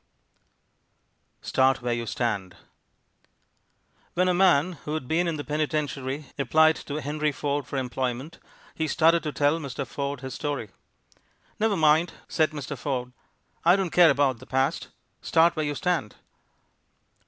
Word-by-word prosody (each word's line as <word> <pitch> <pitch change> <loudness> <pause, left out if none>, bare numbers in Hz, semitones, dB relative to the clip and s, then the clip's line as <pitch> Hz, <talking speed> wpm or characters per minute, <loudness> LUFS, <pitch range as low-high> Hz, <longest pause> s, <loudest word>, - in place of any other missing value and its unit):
START 130 -1 +2
WHERE 120 -1 0
YOU 120 0 -3
STAND 100 -8 -2 1.6
When 180 +1 +2
a 180 - +3
man 180 -2 +4
who 150 - -2
had 155 -5 -4
been 170 +4 +1
in 165 -2 -1
the 145 - -4
penitentiary 150 -2 -2
applied 155 +4 +4
to 145 - -7
Henry 150 +1 -1
Ford 140 -1 -2
for 140 - -4
employment, 130 +3 -3 0.3
he 160 - -2
started 165 +1 +3
to 150 - -3
tell 145 +3 +1
Mr. 140 -2 -5
Ford 140 +1 -4
his 130 -1 -6
story. 140 -9 -4 0.9
"Never 215 -2 +2
mind," 160 +2 +3
said 155 -1 +2
Mr. 145 -2 -6
Ford, 125 -1 -3 0.5
"I 175 +2 +6
don't 190 -4 -1
care 175 -2 +7
about 135 -3 +2
the - - -14
past. 130 +1 0 0.3
Start 165 +1 +3
where 155 -2 -1
you 145 - -2
stand!" 175 - -1
145 Hz, 145 wpm, -26 LUFS, 130-160 Hz, 1.6 s, care